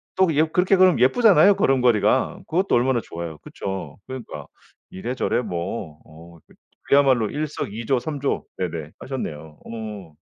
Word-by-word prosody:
또 190 Hz, 0 st, +4 dB
예 155 Hz, -, +5 dB
그렇게 180 Hz, +4 st, +2 dB
그러면 185 Hz, -6 st, +5 dB
예쁘잖아요 200 Hz, -, +5 dB
걸음걸이가. 125 Hz, -, +2 dB
그것도 185 Hz, +4 st, +1 dB
얼마나 120 Hz, 0 st, +2 dB
좋아요. 85 Hz, -4 st, -7 dB
그쵸. 95 Hz, -1 st, -6 dB
그러니까 130 Hz, -3 st, -8 dB, 0.4 s
이래저래 120 Hz, +5 st, -2 dB
뭐 90 Hz, -5 st, -5 dB
어 85 Hz, +2 st, -15 dB
그 -, -, -22 dB, 0.3 s
그야말로 130 Hz, -6 st, +4 dB
일석이조, 130 Hz, -4 st, -2 dB
삼조 140 Hz, +1 st, -3 dB
네네 80 Hz, -4 st, -4 dB
하셨네요. 80 Hz, -, -6 dB
어. 105 Hz, -7 st, -8 dB
120 Hz, 335 characters per minute, -23 LUFS, 90-145 Hz, 0.4 s, 예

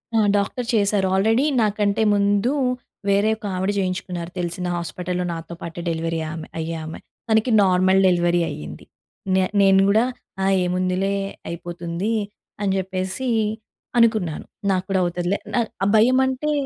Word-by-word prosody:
ఆ! -, -, +4 dB, 0.2 s
డాక్టర్ 220 Hz, +4 st, -2 dB
చేసారు. 200 Hz, -2 st, +2 dB
ఆల్రెడీ 225 Hz, +7 st, +3 dB, 0.2 s
నాకంటే 205 Hz, -1 st, +1 dB
ముందు, 205 Hz, +3 st, +2 dB, 0.6 s
వేరే 200 Hz, +2 st, +3 dB
ఒక 215 Hz, -, -11 dB
ఆవిడ 190 Hz, +2 st, 0 dB
జేయించుకున్నారు 185 Hz, -2 st, -3 dB
తెలిసిన 180 Hz, +1 st, -3 dB
హాస్పిటల్‌లో 180 Hz, +1 st, -3 dB
నాతో 165 Hz, 0 st, -7 dB
పాటే, 170 Hz, 0 st, -6 dB
డెలివరీ 165 Hz, 0 st, -2 dB
ఆమె 160 Hz, -1 st, -7 dB
అయ్యే 165 Hz, +1 st, -3 dB
ఆమె. 160 Hz, -, -7 dB, 0.3 s
తనకి 220 Hz, +2 st, +3 dB
నార్మల్ 185 Hz, 0 st, +4 dB
డెలివరీ 175 Hz, -1 st, +2 dB
అయింది. 75 Hz, -1 st, -8 dB, 0.5 s
నే 190 Hz, -, +4 dB, 0.2 s
నేను 195 Hz, -1 st, +5 dB
గూడా 215 Hz, +3 st, +4 dB, 0.4 s
ఆ -, -, +2 dB, 0.2 s
ఏముందిలే 185 Hz, +2 st, 0 dB, 0.3 s
అయిపోతుంది 170 Hz, +3 st, -4 dB, 0.5 s
అని 200 Hz, -1 st, +1 dB
జెప్పేసి 190 Hz, +6 st, -3 dB, 0.7 s
అనుకున్నాను. 220 Hz, -9 st, +2 dB, 0.3 s
నాకు 185 Hz, -1 st, 0 dB
కూడా 195 Hz, -1 st, +2 dB
అవుతదిలే 175 Hz, +2 st, -1 dB, 0.2 s
నా -, -, +2 dB, 0.2 s
ఆ -, -, +3 dB
భయమంటే 260 Hz, +5 st, +3 dB
190 Hz, 135 wpm, -22 LUFS, 175-205 Hz, 0.7 s, నేను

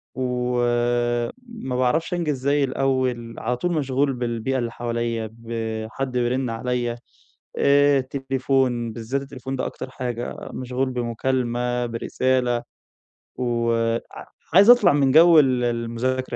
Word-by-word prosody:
و 125 Hz, -1 st, -1 dB, 0.9 s
ما 220 Hz, -, -5 dB
باعرفش 140 Hz, +8 st, +1 dB
أنجز 155 Hz, -5 st, -1 dB
زي 140 Hz, +2 st, +2 dB
الأول، 130 Hz, -3 st, -1 dB
على 125 Hz, -, -1 dB
طول 175 Hz, +7 st, -1 dB
مشغول 140 Hz, -2 st, 0 dB
بالبيئة 120 Hz, +1 st, -2 dB
اللي 120 Hz, -1 st, -2 dB
حواليّا، 115 Hz, -1 st, -3 dB
بحد 115 Hz, +2 st, -4 dB
بيرن 125 Hz, +1 st, 0 dB
عليّا 120 Hz, +1 st, -2 dB, 0.6 s
آآ 140 Hz, 0 st, +4 dB
تليفون، 130 Hz, -3 st, -1 dB
بالذات 115 Hz, +5 st, -3 dB
التليفون 135 Hz, -1 st, -6 dB
ده -, -, -2 dB
أكتر -, -, -6 dB
حاجة، 120 Hz, -2 st, -4 dB, 0.2 s
مشغول 130 Hz, +1 st, -2 dB
بمكالمة، 120 Hz, 0 st, -1 dB
برسالة، 120 Hz, +1 st, 0 dB, 0.7 s
وع 115 Hz, -1 st, 0 dB, 0.5 s
عايز 200 Hz, +6 st, +7 dB
أطلع 245 Hz, -8 st, +7 dB
من 140 Hz, -2 st, +3 dB
جو 165 Hz, +2 st, +8 dB
ال 130 Hz, -4 st, +2 dB
المذاكرة 120 Hz, +2 st, -2 dB
125 Hz, 115 wpm, -23 LUFS, 120-135 Hz, 0.9 s, جو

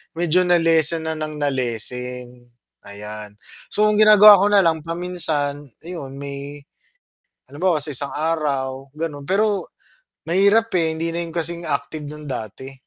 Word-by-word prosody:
medyo 175 Hz, +2 st, +2 dB
na-lessen 165 Hz, -2 st, +3 dB
na 160 Hz, -, -2 dB
ng 155 Hz, -1 st, -6 dB
na-lessen, 125 Hz, -2 st, -3 dB, 0.4 s
ayan. 105 Hz, +1 st, -8 dB, 0.4 s
So, 210 Hz, 0 st, +2 dB
ang 210 Hz, -, +1 dB
ginagawa 210 Hz, -1 st, +9 dB
ko 200 Hz, -, +3 dB
na 205 Hz, -, +6 dB
lang 160 Hz, -2 st, +1 dB
paminsan 165 Hz, -4 st, -2 dB, 0.2 s
iyun 160 Hz, -6 st, -8 dB
may 140 Hz, +1 st, -7 dB, 0.9 s
halimbawa 165 Hz, +2 st, 0 dB
sa 150 Hz, -, -1 dB
isang 140 Hz, +2 st, -2 dB
araw 140 Hz, -4 st, -2 dB
gano'n, 150 Hz, -3 st, -5 dB
pero 205 Hz, +1 st, 0 dB, 0.6 s
mahirap, 200 Hz, +6 st, +3 dB
eh, 160 Hz, -1 st, +2 dB
hindi 165 Hz, +1 st, -2 dB
na 170 Hz, -, -2 dB
'yun 165 Hz, -, -9 dB
kasing 170 Hz, +1 st, -1 dB
active 145 Hz, +1 st, -3 dB
ng 150 Hz, 0 st, -10 dB
dati. 130 Hz, +2 st, -7 dB
155 Hz, 140 wpm, -21 LUFS, 135-170 Hz, 0.9 s, ginagawa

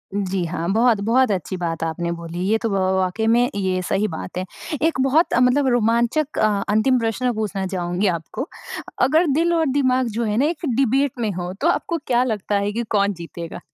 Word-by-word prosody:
जी 195 Hz, -2 st, -1 dB
हाँ। 165 Hz, 0 st, -3 dB
बहुत, 230 Hz, -1 st, +3 dB
बहुत 230 Hz, +4 st, +2 dB
अच्छी 185 Hz, 0 st, -2 dB
बात 165 Hz, -2 st, -3 dB
आपने 165 Hz, +1 st, -2 dB
बोली। 170 Hz, 0 st, -6 dB
ये 220 Hz, -, +3 dB
तो 230 Hz, -, 0 dB
व -, -, -2 dB
व -, -, +1 dB, 0.2 s
व -, -, +1 dB
वाक़ई 190 Hz, +4 st, 0 dB
में 240 Hz, +2 st, +3 dB
ये 185 Hz, -2 st, 0 dB
सही 200 Hz, +2 st, +1 dB
बात 175 Hz, 0 st, -7 dB
है। 185 Hz, -, -2 dB, 0.4 s
एक 320 Hz, -3 st, +1 dB
बहुत, 280 Hz, +6 st, +3 dB
अ, -, -, +3 dB
मतलब, 250 Hz, +3 st, +3 dB
रोमांचक 240 Hz, +5 st, +1 dB
अ 215 Hz, -, +4 dB, 0.2 s
अंतिम 220 Hz, +5 st, +3 dB
प्रश्न 230 Hz, +2 st, 0 dB
पूछना 210 Hz, -3 st, -2 dB
चाहूँगी 180 Hz, +1 st, -1 dB
आपको। 210 Hz, -, -6 dB, 0.5 s
अगर 310 Hz, +7 st, +4 dB
दिल 340 Hz, +1 st, +2 dB
और 325 Hz, -1 st, +2 dB
दिमाग 260 Hz, -2 st, +2 dB
जो 235 Hz, -, 0 dB
है 215 Hz, -1 st, -1 dB
ना 270 Hz, -, +3 dB
एक 335 Hz, +2 st, -2 dB
डिबेट 270 Hz, +2 st, +2 dB
में 220 Hz, -3 st, 0 dB
हो 180 Hz, -1 st, -4 dB
तो 310 Hz, -, +2 dB
आपको 340 Hz, -1 st, 0 dB
क्या 245 Hz, 0 st, +3 dB
लगता 210 Hz, -4 st, -2 dB
है 200 Hz, +1 st, -1 dB
कि 235 Hz, +2 st, -2 dB
कौन 200 Hz, -1 st, +2 dB
जीतेगा? 170 Hz, -1 st, -8 dB
220 Hz, 215 wpm, -21 LUFS, 185-255 Hz, 0.5 s, अ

